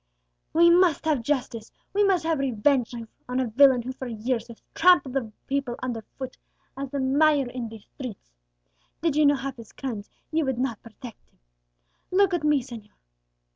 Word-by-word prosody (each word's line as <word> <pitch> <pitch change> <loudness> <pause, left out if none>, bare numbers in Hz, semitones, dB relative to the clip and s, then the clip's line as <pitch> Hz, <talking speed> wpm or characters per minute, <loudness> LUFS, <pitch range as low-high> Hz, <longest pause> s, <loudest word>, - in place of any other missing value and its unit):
"We 340 +1 +6
must 345 -4 +4
have 305 -6 +2
justice, 240 -4 -2 0.2
we 410 +1 +3
must 380 -4 +3
have 325 -3 +1
revenge 260 0 +1 0.4
on 250 +1 0
a 260 - +1
villain 255 +1 +5
who 255 - -4
for 260 0 -7
years 230 +1 -2
has 235 -2 -13
trampled 345 -7 +4
the 245 -5 -2
people 275 -3 -2
under 240 -3 -3 0.2
foot 260 -1 -6 0.4
as 275 0 -5
the 280 - -3
mire 280 +1 +3
in 245 -3 -5
the 225 - -9
streets! 215 - -10 0.7
Did 325 -4 +1
ye 305 0 +4
know 285 0 +5
half 270 0 -5
his 230 -2 -12
crimes, 225 -7 -5 0.2
ye 320 +1 +2
would 265 -4 -1
not 245 -4 -2
protect 230 +1 -12
him. - - -37 0.7
Look 385 0 +3
at 345 -3 0
me, 300 -3 +3
señor!" 230 -4 -11
265 Hz, 180 wpm, -26 LUFS, 235-300 Hz, 0.7 s, We